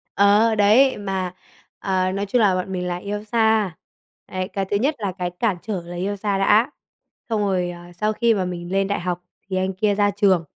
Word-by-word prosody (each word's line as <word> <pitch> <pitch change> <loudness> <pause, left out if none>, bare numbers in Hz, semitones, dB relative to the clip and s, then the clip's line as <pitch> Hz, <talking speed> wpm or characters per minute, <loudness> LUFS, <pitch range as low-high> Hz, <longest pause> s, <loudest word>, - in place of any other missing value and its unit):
Ờ, 205 +3 +4
đấy, 220 +6 +5
mà, 190 -3 -3 0.5
ờ, 185 -1 0
nói 195 +1 -2
chung 235 +5 +1
là 200 -4 +4
bọn 185 +1 -3
mình 180 -1 -2
là 175 0 -2
yêu 205 +3 -5
xa. 220 -4 +2 0.5
Đấy, 185 0 -3
cái 195 -1 -1
thứ 200 +2 0
nhất 275 +8 +1
là 200 -3 -2
cái 180 -1 -2
cản 215 -6 +1
trở 205 -5 -3
là 175 +1 -8
yêu 195 +3 -2
xa 200 0 -1
đã. 215 +7 +4 0.6
Xong 220 -2 0
rồi, 185 -3 0
ờ, 175 0 -10
sau 215 +5 -1
khi 230 +1 +3
mà 190 -4 0
mình 175 -1 -5
lên 195 0 +1
đại 200 - -1
học 175 0 -3 0.3
thì 190 - -1
anh 190 +1 0
kia 205 +2 +1
ra 205 0 +2
trường, 195 -4 +3
195 Hz, 220 wpm, -22 LUFS, 185-210 Hz, 0.6 s, đấy